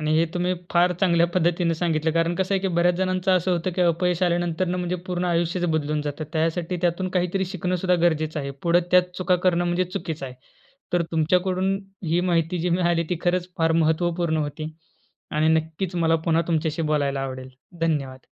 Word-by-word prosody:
आणि 155 0 0
हे 165 - +4
तुम्ही 180 +1 0 0.2
फार 175 +1 +3
चांगल्या 170 -3 +4
पद्धतीने 175 -1 +2
सांगितलं 160 -1 0
कारण 165 +1 +1
कसं 190 +2 0
आहे 190 - +1
की 190 - 0
बऱ्याच 175 0 +2
जणांचं 185 0 0
असं 185 0 +2
होतं 175 +1 -1
की 185 - -1
अपयश 175 +1 +1
आल्यानंतर 175 0 +1
म्हणजे 180 0 -2
पूर्ण 180 0 -2
आयुष्यच 175 +1 0
बदलून 155 -2 0
जातं. 150 +1 -4
त्यासाठी 165 +2 -1
त्यातून 175 +2 0
काहीतरी 185 +1 0
शिकणं 185 -1 -2
सुद्धा 180 0 +1
गरजेचं 155 -2 +1
आहे. 140 0 -4
पुढं 170 +1 +4
त्यात 180 0 +3
चुका 185 0 +2
करणं 175 -1 +3
म्हणजे 175 +1 +1
चुकीचं 165 -6 -5
आहे. 125 - -9 0.6
तर 175 - +3
तुमच्याकडून 185 +4 +1 0.3
ही 170 +2 +2
माहिती 175 -1 0
जी 175 +2 -1
मिळाली 170 -1 +2
ती 180 - +1
खरंच 180 0 0
फार 165 0 +3
महत्त्वपूर्ण 165 +1 +1
होती 155 +1 -3 0.6
आणि 155 +1 +2
नक्कीच 165 +3 -5
मला 165 -1 +3
पुन्हा 165 0 +2
तुमच्याशी 160 0 0
बोलायला 140 -2 0
आवडेल. 130 -1 -5 0.3
धन्यवाद. 140 -5 -2
170 Hz, 185 wpm, -24 LUFS, 160-180 Hz, 0.6 s, हे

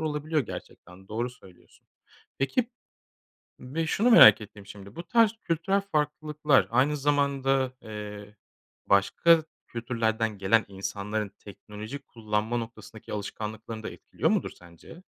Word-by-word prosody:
olabiliyor, 155 0 -1
gerçekten 95 -5 -10
doğru 120 +3 -2
söylüyorsun. 95 -7 -20 0.5
Peki 225 - 0 0.9
ve 160 +6 -3
şunu 220 +9 +2
merak 110 - +9
ettim, 105 -1 -12
şimdi 100 0 -12
bu 170 - -5
tarz 230 -1 +4
kültürel 170 +4 0
farklılıklar 150 -1 +1
aynı 135 +5 +2
zamanda, 135 -2 +1
eee, 105 -1 -8 0.5
başka 160 - +4 0.3
kültürlerden 115 -2 -1
gelen 105 +4 +3
insanların 100 +2 -4
teknoloji 105 +5 -9
kullanma 110 -3 -3
noktasındaki 110 -2 -8
alışkanlıklarını 110 +2 -6
da - - -5
etkiliyor - - -2
mudur - - 0
sence? 90 - -15
115 Hz, 115 wpm, -27 LUFS, 105-150 Hz, 0.9 s, merak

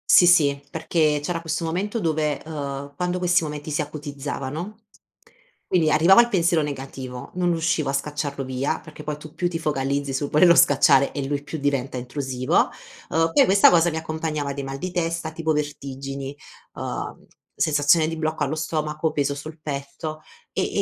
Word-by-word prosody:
Sì 175 - +8
sì, 145 -5 +4
perché 155 -1 +1
c'era 170 +2 -2
questo 165 0 -2
momento 190 +8 -2
dove, 155 -3 0
uhm, 140 -2 -5
quando 180 +3 -1
questi 180 -1 +2
momenti 150 0 -5
si 150 - 0
acutizzavano 150 +4 -5 0.9
quindi 165 -4 +3
arrivava 170 +7 +6
il 235 - +1
pensiero 170 -5 +2
negativo, 135 -3 -6
non 180 -1 +1
riuscivo 165 -3 0
a - - -1
scacciarlo 145 0 -2
via, 130 +4 -2
perché 155 -1 -11
poi 150 -1 -3
tu 150 +1 -12
più 175 +1 -1
ti 170 - -3
focalizzi 140 -2 -1
sul 140 +2 -2
volerlo 170 +3 +6
scacciare 140 -2 +5
e 140 -2 -3
lui 145 +1 -2
più 150 +2 -6
diventa 140 -2 -1
intrusivo, 130 0 0 0.4
uhm, 165 0 +2
poi - - +6
questa 195 +1 +6
cosa 175 0 +4
mi 160 - -5
accompagnava 155 -2 -3
di 140 0 -5
mal 135 0 -5
di 185 +6 -4
testa, 165 -2 -2
tipo 160 0 -1
vertigini, 140 -2 -4 0.4
uhm, - - -5 0.3
sensazione 155 +1 +3
di 165 - -4
blocco 155 -1 -1
allo 145 +2 -1
stomaco, 155 0 -2
peso 140 -1 0
sul 155 +3 -9
petto, 145 +2 -5 0.3
ehm, - - -1
e - - -1
150 Hz, 175 wpm, -23 LUFS, 140-165 Hz, 0.9 s, Sì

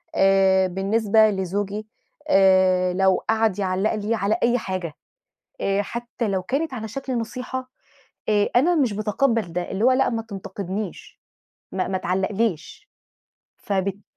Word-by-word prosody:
آآ، 190 -1 +4
بالنسبة 215 +3 +3
لزوجي 200 +2 -3 0.4
آآ 185 -2 +4
لو 190 0 +2
قعد 220 -3 +2
يعلّق 190 +3 0
لي 215 +2 -1
على 210 +2 0
أي 240 +1 +3
حاجة، 185 -7 -4 0.7
آآ، 195 +1 +1
حتى 235 +1 -4
لو 190 -2 -1
كانت 280 - -2
على 220 -3 -5
شكل 260 +2 -4
نصيحة، 255 +2 -5 0.6
آآ، 205 -1 +2
أنا 335 +8 +4
مش 260 -9 +2
باتقَبَل 215 -2 0
ده، 180 0 -3
اللي 195 +3 -2
هو 260 - +6
لأ، 265 +1 +3
ما 225 -1 -2
تنتقدنِيش، 195 -2 -6 0.5
ما 185 -1 -1
ما 190 - -1
تعلقليش. 195 - -2 0.7
فبالتالي 195 0 -2
205 Hz, 135 wpm, -23 LUFS, 190-230 Hz, 0.7 s, هو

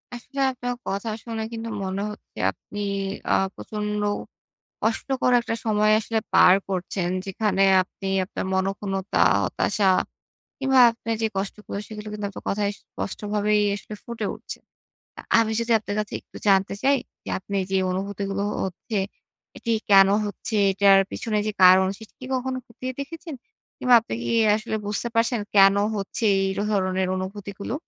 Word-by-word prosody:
আসলে 275 +3 -8
আপনার 245 -1 -4
কথা 200 +3 -2
শুনে 225 -2 -4
কিন্তু 230 0 -5
মনে 190 +1 -3
হচ্ছে, 210 - -15
আপনি 205 - -10 0.5
আ - - +5 0.2
প্রচন্ড 210 -1 -4 0.8
কষ্টকর 250 +3 0
একটা 230 -1 -3
সময় 215 -1 +3
আসলে 225 0 -1
পার 180 - +7
করছেন। 185 -1 -2 0.2
যেখানে 195 0 0 0.2
আপনি 195 +1 -9 0.2
আপনার 190 - -5
মনঃক্ষুণ্ণতা, 195 0 -1 0.2
হতাশা 200 -2 +1 0.7
কিংবা 270 -1 +3
আপনে 230 0 -6
যে 225 - +2
কষ্টগুলো, 200 +1 -4
সেগুলো 215 -1 -8
কিন্তু 210 -1 -4
আপনার 200 - -10
কথায় 205 0 0
স্পষ্টভাবেই 210 +1 -1
আসলে 210 +1 -8
ফুটে 235 -2 -4
উঠছে। - - -8 0.6
আ - - -5 0.2
আমি 220 -1 +2
যদি 230 0 0
আপনার 205 -1 -5
কাছে 210 - -5
একটু - - -17
জানতে 195 0 +3
চাই 275 +1 +4 0.3
যে, - - -9
আপনি 200 +1 -5
যে 195 - +2
অনুভূতিগুলো 195 +1 -3 0.2
হচ্ছে 190 +3 -4 0.6
এটি 230 - -2 0.2
কেন 195 -1 +8 0.2
হচ্ছে, 205 +2 -5 0.2
এটার 195 0 +6
পিছনে 215 -3 -2
যে 215 - -1
কারণ 185 +1 +8
সেটি 220 -1 -13
কি 255 - -7
কখনো 260 0 -2
খতিয়ে 255 +2 -6
দেখেছেন? 320 +2 -7 0.4
কিংবা 250 -1 +4
আপনি 220 - -6
কি - - -2 0.3
আসলে 220 0 -3
বুঝতে 210 +3 -1
পারছেন, 230 +1 +2 0.2
কেন 195 0 +7 0.2
হচ্ছে 200 +3 -4 0.2
এই 195 - 0 0.2
ধরনের 185 -2 0
অনুভূতিগুলো? 200 +3 -5
210 Hz, 150 wpm, -24 LUFS, 195-230 Hz, 0.8 s, কেন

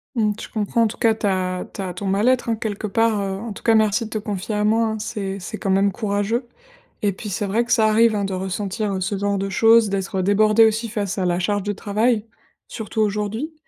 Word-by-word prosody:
Mmh, 215 -3 +2
je - - -7
comprends, 220 +1 0
en - - +3
tout 215 - -7
cas, 225 -1 +3
ta 185 -4 -1
ta 190 -2 -4
ton 200 - -5
mal-être, 220 +7 +2
hein, 225 - +2
quelque 215 -1 -4
part. 220 +1 +1
Heu, 195 -1 -3
en 230 +1 -6
tout 200 - -10
cas, 230 - +4
merci 220 0 +2
de - - -8
te - - -2
confier 205 -1 -4
à 210 - 0
moi, 225 +2 +3
hein, 220 -1 -2
c'est 200 -2 -4
c'est 180 - -6
quand 195 - -2
même 195 +1 +3
courageux 210 +4 -1 0.6
et 205 - +3
puis 210 +3 -7
c'est 200 +1 -2
vrai 225 +5 +1
que 240 - -7
ça 225 -3 +4
arrive, 225 +1 +4
hein, 205 - -1
de 195 - -3
ressentir 190 +1 -3
ce 190 +2 -1
genre 200 0 0
de 195 0 -2
choses, 225 +2 +5
d'être 195 -1 -2
débordé 215 +3 +4
aussi 220 +1 +1
face 205 -3 -3
à 190 - 0
la 175 -1 +1
charge 205 +1 0
de 205 - -2
travail, 215 +3 0 0.4
surtout 220 -1 -3
aujourd'hui. 210 +8 -2
210 Hz, 235 wpm, -21 LUFS, 195-225 Hz, 0.6 s, choses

